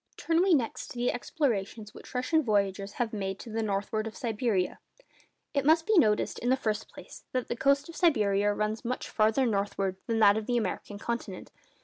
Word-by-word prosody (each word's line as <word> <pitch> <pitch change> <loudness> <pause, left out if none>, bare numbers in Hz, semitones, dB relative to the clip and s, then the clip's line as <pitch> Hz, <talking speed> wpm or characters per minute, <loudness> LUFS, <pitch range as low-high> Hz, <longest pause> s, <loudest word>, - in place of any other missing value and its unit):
Turn 330 0 +1
we 370 -2 +5
next 240 -6 -2
to - - -10
the 245 +1 +1
explorations 225 - -2
which - - -13
Russian 285 +6 +2
voyagers 200 -4 0
have 235 -2 -2
made 195 -2 -3
to 230 - -10
the 225 +1 -1
northward 215 +1 -1
of 220 - -8
Siberia. 220 -6 -1 0.7
It 280 -2 +1
must 320 +3 +4
be 435 - +2
noticed, 215 - +3
in 245 - -1
the 260 - +4
first 215 -4 -2
place, - - -12
that 255 -1 -2
the - - -1
coast 280 +3 +2
of 335 - -10
Siberia 205 - +3
runs 215 +1 -2
much 250 +1 -3
farther 220 +4 +3
northward 200 -3 -1
than 230 - 0
that 205 -1 +6
of 220 - -4
the 245 -1 +1
American 215 -2 -3
continent. 225 -3 -5
225 Hz, 200 wpm, -29 LUFS, 205-255 Hz, 0.7 s, that